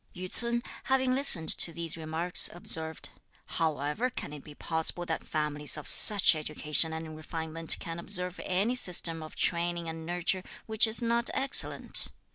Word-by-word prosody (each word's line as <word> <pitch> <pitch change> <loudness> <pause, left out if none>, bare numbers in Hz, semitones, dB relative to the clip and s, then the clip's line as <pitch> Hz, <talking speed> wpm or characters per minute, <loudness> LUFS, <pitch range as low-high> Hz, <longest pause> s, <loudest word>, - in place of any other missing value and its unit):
Yü 185 0 -7
ts'un, 235 0 -2 0.2
having 260 -1 +1
listened 255 - +4
to 170 - +5
these 165 -1 -4
remarks, 165 +2 +1
observed: 160 -2 -3 0.4
"How 160 -2 -1
ever 150 - -2
can 190 - -6
it 145 - -10
be 150 - -13
possible 160 +3 -2
that 160 -2 -4
families 150 -1 -1
of 150 - -8
such 205 -4 +6
education 155 +1 +1
and 160 0 -7
refinement 160 +1 0
can 170 -2 -6
observe 180 -1 -1
any 195 +6 0
system 170 -8 +1
of 155 - -10
training 170 0 -1
and 160 0 -7
nurture 175 +2 -1 0.2
which 220 +1 +3
is 220 +2 -2
not 235 +1 0
excellent? 270 +1 +2
170 Hz, 160 wpm, -29 LUFS, 160-200 Hz, 0.4 s, such